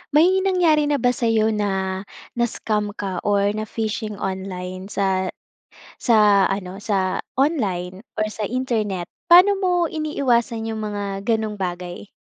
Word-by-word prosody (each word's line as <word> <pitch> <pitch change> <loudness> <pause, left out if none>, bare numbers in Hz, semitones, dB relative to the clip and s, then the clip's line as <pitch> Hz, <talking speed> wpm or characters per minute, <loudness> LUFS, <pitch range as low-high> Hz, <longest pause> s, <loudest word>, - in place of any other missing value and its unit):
May 360 +5 +5
nangyari 345 -6 +3
na 295 - +2
ba 245 -2 +2
sa'yo 225 -3 +1
na, 190 -3 -1 0.4
na-scam 210 -3 -1
ka 190 -4 -3
or 200 0 +3
na 215 +1 -4
fishing 215 -1 -3
online 190 -1 -5
sa 190 -2 0 0.7
sa 210 -4 +5
ano, 195 0 -4
sa 195 -3 0 0.2
online 195 - 0 0.2
or 215 - +1
sa 210 -2 -3
internet? 220 -7 -1 0.2
Paano 380 +3 +7
mo 370 -2 +1 0.2
iniiwasan 255 -7 0
'yung 220 - -4
mga 205 -2 -3
gano'ng 220 -2 0
bagay? 180 +1 -5
210 Hz, 135 wpm, -22 LUFS, 195-245 Hz, 0.7 s, Paano